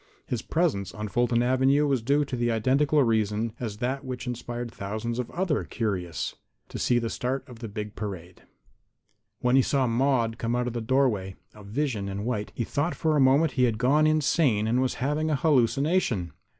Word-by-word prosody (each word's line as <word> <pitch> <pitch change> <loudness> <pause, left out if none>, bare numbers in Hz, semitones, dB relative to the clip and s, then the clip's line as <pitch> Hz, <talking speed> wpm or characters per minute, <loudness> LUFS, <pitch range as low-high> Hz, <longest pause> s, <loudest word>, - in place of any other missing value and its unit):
His 125 -5 -3
presence 125 - -1
on 105 0 -4
Fulton 120 +3 +2
avenue 130 +3 +3
was 135 -4 +1
due 140 +5 +2
to 135 - -4
the 120 -1 0
identical 135 +6 +2
reason 110 -1 0
as 110 -4 -4
that 130 +4 -2
which 125 -1 -5
inspired 120 -1 -5
thousands 110 +4 -4
of 125 - -3
others 175 -5 -1
curious 95 - -2 0.4
to - - -6
see 120 - +2
the 115 -1 0
start 130 +4 -3
of 120 -2 -12
a - - -3
big 105 0 -6
parade. 95 -4 -7 1.0
When 125 +1 +3
he 135 - +6
saw 135 0 +1
Maude 120 -2 +1
come 115 +1 -1
out 125 0 0
of 125 - -3
the 120 - -3
doorway, 110 -6 +1 0.2
a 105 - -13
vision 110 -2 -2
in 100 +2 -4
white, 110 -4 -2
he 120 - -1
thought 150 +8 -1
for 160 -2 +1
a - - +3
moment 140 +4 +4
he 125 -1 +2
had 115 -3 0
gone 145 +6 +3
insane 145 -7 +2
and 120 +3 +2
was 130 - 0
having 150 +5 -1
a 155 - +2
hallucination. 135 - +1
125 Hz, 195 wpm, -26 LUFS, 110-140 Hz, 1.0 s, he